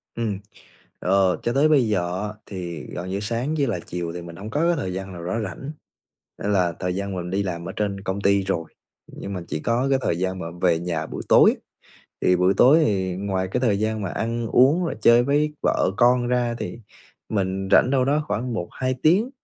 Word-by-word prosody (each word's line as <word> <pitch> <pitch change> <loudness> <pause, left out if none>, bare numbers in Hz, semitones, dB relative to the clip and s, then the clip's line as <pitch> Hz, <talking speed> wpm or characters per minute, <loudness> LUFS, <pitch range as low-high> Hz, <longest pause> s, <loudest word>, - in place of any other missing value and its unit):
Ừm, 110 -4 -2 0.6
ờ, 95 0 +2
cho 120 - 0
tới 145 +3 +4
bây 135 -7 +4
giờ 90 -2 -1
á 105 - -6
thì 85 -5 -6
gần 90 +1 -6
như 100 +1 -2
sáng 120 +8 -2
với 140 -2 +1
lại 90 -7 -2
chiều 85 -1 -4
thì 90 - -6
mình 85 -1 -10
hông 105 +4 -8
có 150 - -1
cái 175 - +3
thời 95 -8 -3
gian 95 0 -6
nào 85 -1 -8
nó 110 +6 -2
rảnh, 105 +9 -6 0.7
nên 105 - 0
là 90 -3 +2
thời 90 -1 -1
gian 100 0 -3
mà 90 - -3
mình 90 - -6
đi 100 +1 0
làm 85 -3 -4
ở - - -5
trên 100 -2 -2
công 95 +1 -3
ty 100 0 +3
rồi, 85 -4 -1 0.4
nhưng 100 - -8
mà 90 - -4
chỉ 75 - -3
có 125 +4 0
cái 135 - +3
thời 85 - 0
gian 95 0 -2
mà 85 - -5 0.2
về 85 -3 +3
nhà 85 -2 -3
buổi - - -6
tối, - - +6 0.7
thì 90 - +4
buổi 90 +2 +3
tối 140 +6 +7
thì 95 -3 -1
ngoài 95 -1 -2
cái 125 - -1
thời 105 -6 +2
gian 110 -1 -1
mà 95 - -3
ăn 115 0 -2
uống 145 +10 +4
và 165 - -2
chơi 120 +1 +6
với 150 +2 +1
vợ - - +2
con 120 0 +4
ra 120 -1 +1
thì - - -5 0.5
mình 95 -2 -1
rảnh 125 - +6
đâu 130 -2 +3
đó 150 +2 +1
khoảng 120 0 -2
1-2 130 +7 -2
tiếng 195 +11 +3
100 Hz, 230 wpm, -23 LUFS, 90-120 Hz, 0.7 s, tối